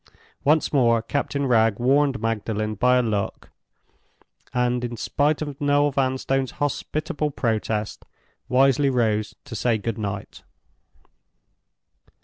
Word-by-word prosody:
Once 155 +2 +2
more 120 -4 +4
Captain 140 +3 -2
Wragge 115 -4 +3
warned 135 0 +2
Magdalen 110 -1 -2
by 125 +4 +3
a 125 - +2
look, 105 -3 -3 1.0
and, 125 0 0
in 120 -1 -4
spite 145 +7 0
of 145 -2 -7
Noel 145 0 +3
Vanstone's 135 0 0
hospitable 150 +1 -2
protest, 110 -5 -2 0.5
wisely 135 +2 +4
rose 110 -4 0
to - - -8
say 115 +1 +1
good 110 +1 -4
night. 100 -2 -5
125 Hz, 115 wpm, -23 LUFS, 110-140 Hz, 1.0 s, more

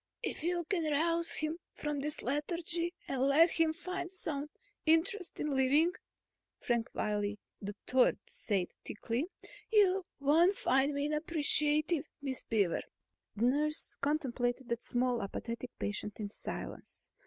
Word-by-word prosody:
"If - - -2
you 345 +2 0
can 335 -6 0
rouse 335 +3 +1
him 310 +2 -1 0.2
from 295 -1 -2
this 300 +2 -4
lethargy 335 +5 -1 0.2
and 270 +1 +2
help 325 +5 +7
him 325 -1 +3
find 355 +2 -5
some 300 -6 -4 0.3
interest 335 +4 +2
in 300 -2 0
living," 285 +6 +4 0.7
Frank 235 -2 0
Wiley 210 0 0 0.3
III 210 +6 +2
said 195 -5 -1
thickly, 235 +8 -2 0.4
"you 390 -3 +5 0.2
won't 330 +7 +4
find 270 +3 +3
me 285 0 0
unappreciative, 300 0 +1
Miss 270 -2 -3
Beaver." 200 -7 +1 0.5
The 220 +3 +2
nurse 300 +4 +1
contemplated 265 -4 0
that 235 0 -1
small, 245 -1 +1
apathetic 230 +5 -4
patient 210 0 -3
in 205 -2 -3
silence. - - -5
295 Hz, 130 wpm, -33 LUFS, 245-330 Hz, 0.7 s, help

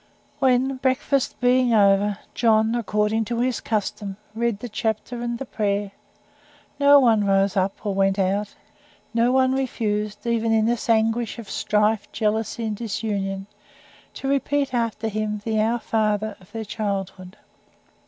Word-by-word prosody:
When, 260 0 +2
breakfast 260 +1 0
being 250 -1 +3
over, 200 0 +4 0.2
John 220 -1 +3
according 220 -1 0
to 235 +2 -3
his 250 0 0
custom 205 -2 -3 0.2
read 235 -1 -1
the 245 - -7
chapter 225 +2 -3
and 240 0 -2
the 270 - -6
prayer 205 -3 -1 0.9
no 285 0 +7
one 225 -5 +4
rose 195 0 +2
up 195 +2 -1
or 205 - 0
went 195 0 +2
out; 200 +2 0 0.6
no 235 +1 +3
one 260 0 +3
refused, 215 -6 -2
even 230 -1 +1
in 220 -1 +3
this 235 0 -1
anguish 225 +1 +1
of 230 -3 -8
strife, 210 0 +1
jealousy, 220 +1 -1
and 215 -1 -2
disunion 200 -3 -3 0.7
to 270 - -5
repeat 280 0 0
after 230 -2 -1
him 215 -1 -2
the 220 -1 0
"Our 230 +2 +1
Father" 215 -2 -1
of 185 - -20
their 225 -1 -5
childhood. 195 -3 -4
220 Hz, 145 wpm, -23 LUFS, 205-240 Hz, 0.9 s, no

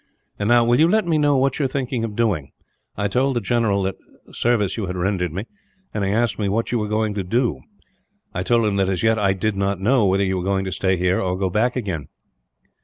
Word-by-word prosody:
"And 105 +1 0
now, 120 0 +5
will 120 +2 +3
you 160 - +6
let 215 +2 +2
me 160 -3 +1
know 145 -2 +3
what 135 +2 +1
you 145 - +1
are - - +3
thinking 130 -3 -2
of 110 -2 -4
doing? 100 - -1 0.4
I 100 0 0
told 130 +6 +1
the - - +2
general 110 -3 +1
what 95 0 -2 0.3
service 115 -5 +1
you 105 -4 -3
had 90 - -4
rendered 90 -2 -1
me, 95 +6 -4 0.5
and 105 - -2
he 95 - 0
asked 115 +2 0
me 100 -2 0
what 115 +3 -1
you 120 - +1
were 105 - -2
going 105 0 0
to 100 -2 -3
do. 115 - 0 0.7
I 90 - -2
told 115 +4 +2
him 100 -2 0
that, 95 -1 +1
as 95 +1 -1
yet, 110 0 +3
I 100 -2 +2
did 105 +2 -1
not 100 -1 -1
know 110 +2 +3
whether 95 +1 +2
you 95 0 -1
were 90 - -3
going 95 0 0
to 95 - -3
stay 95 +1 0
here, 90 +1 +1
or 90 -1 -1
go 95 -1 -1
back 115 +6 +1
again." 95 - -3
105 Hz, 250 wpm, -21 LUFS, 95-120 Hz, 0.7 s, you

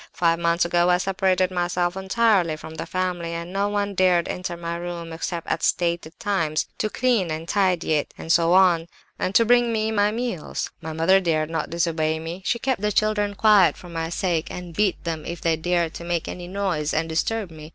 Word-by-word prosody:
Five 170 -1 +2
months 170 0 +2
ago 175 0 +2
I 180 - +5
separated 185 -1 +1
myself 175 0 -1
entirely 190 -3 +2
from 160 - -10
the 165 +1 -6
family, 175 -2 -2
and 170 +2 -6
no 200 +1 0
one 205 -1 -1
dared 180 -2 +3
enter 180 -1 -4
my 170 0 -4
room 170 -1 -6
except 165 +1 -4
at - - -2
stated 170 -2 -1
times, 165 -7 0
to 215 - 0
clean 230 -7 +1
and 160 +1 -4
tidy 180 -4 +1
it, 150 -2 0
and 165 - -4
so 170 0 +4
on, 180 -3 +4 0.3
and 185 +1 -2
to 230 - +6
bring 240 0 +4
me 220 -1 0
my 205 -1 +3
meals. 230 -6 -3
My 160 - -5
mother 165 +5 +4
dared 160 -3 0
not 165 - -2
disobey 160 -2 0
me; 165 +3 -6
she - - +1
kept 255 -3 -1
the 210 0 +1
children 210 -1 +1
quiet, 205 -4 +5
for 180 - -12
my 165 -1 -3
sake, 170 -1 -1
and 180 -1 -7
beat 200 +2 0
them 165 -2 -3
if 170 +1 -6
they 165 -1 +1
dared 170 0 0
to - - -8
make 170 -1 -2
any 175 -1 -6
noise 180 -6 -1
and 165 - 0
disturb 185 +4 -1
me. 155 -1 -11
175 Hz, 210 wpm, -23 LUFS, 165-195 Hz, 0.3 s, to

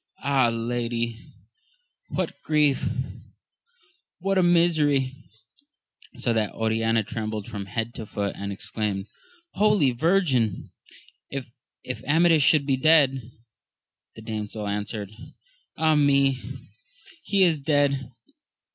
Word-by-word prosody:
Ah, 135 -3 +3
lady! 115 0 -3 0.8
what - - -2
a - - -31
grief 150 -3 +2 0.6
— 460 -5 -39
what 195 +1 +1
a - - +5
misery! 155 -6 +3 1.0
So 120 - 0
that 110 -2 0
Oriana 115 0 +1
trembled 110 -1 -5
from 100 -1 -6
head 115 +4 -3
to 110 - -7
foot, 100 -1 -3
and 100 0 -5
exclaimed. 100 0 -3 0.5
Holy 205 -10 +3
Virgin, 130 - +1 0.6
if 125 -2 -8
Amadis 160 +1 +4
should 145 0 +5
be 135 -2 +1
dead! 135 -5 +3 0.8
The 110 - -11
damsel 105 -1 -5
answered. 105 0 -4 0.7
Ah 160 0 +3
me, 140 -3 +3 0.8
he 200 -2 +2
is 165 -4 +3
dead 140 -3 +1
130 Hz, 110 wpm, -25 LUFS, 110-155 Hz, 1.0 s, a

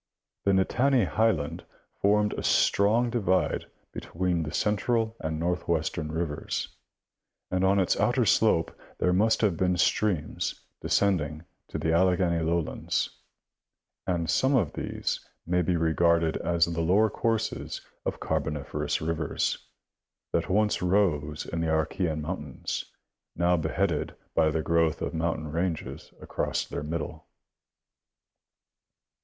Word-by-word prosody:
The 100 - +4
Nittany 120 +5 +3
highland 90 -7 0 0.4
formed 105 +1 +3
a - - -4
strong 115 +4 +3
divide 95 -6 +1 0.2
between 90 -1 -2
the 75 -2 -4
central 110 +3 0
and 80 0 -3
northwestern 85 -2 -1
rivers, 80 -2 -3 0.8
and 90 0 +1
on 100 +1 +4
its 95 - +2
outer - - +2
slope - - +3 0.2
there 90 - +2
must 110 +5 +3
have 105 -6 +2
been 90 0 +1
streams 90 -4 0 0.2
descending 80 -6 +1 0.2
to - - -5
the 80 - 0
Alleghany 90 -1 +2
lowlands; 85 0 -1 1.0
and 85 -3 0
some 130 - +2
of 100 - +1
these - - -3 0.2
may 90 +1 +1
be 90 +1 +1
regarded 80 0 +2
as 85 -1 +2
the 85 -1 -2
lower 100 +6 +3
courses 115 -1 -2 0.2
of - - -3
Car - - 0
boniferous 75 +1 -3
rivers, 80 -1 -1 0.6
that - - 0
once 105 +2 +2
rose 85 -6 +1
in 85 - -3
the 80 - 0
Archean 80 0 0
mountains, 75 -4 -4 0.5
now 85 +1 +3
beheaded 80 0 -1 0.2
by 80 -1 +3
the 80 0 -1
growth 85 -1 +2
of - - -3
mountain 80 -2 -2
ranges 85 0 -3
across - - -2
their - - -5
middle. 75 +1 -5
85 Hz, 125 wpm, -27 LUFS, 80-100 Hz, 1.0 s, The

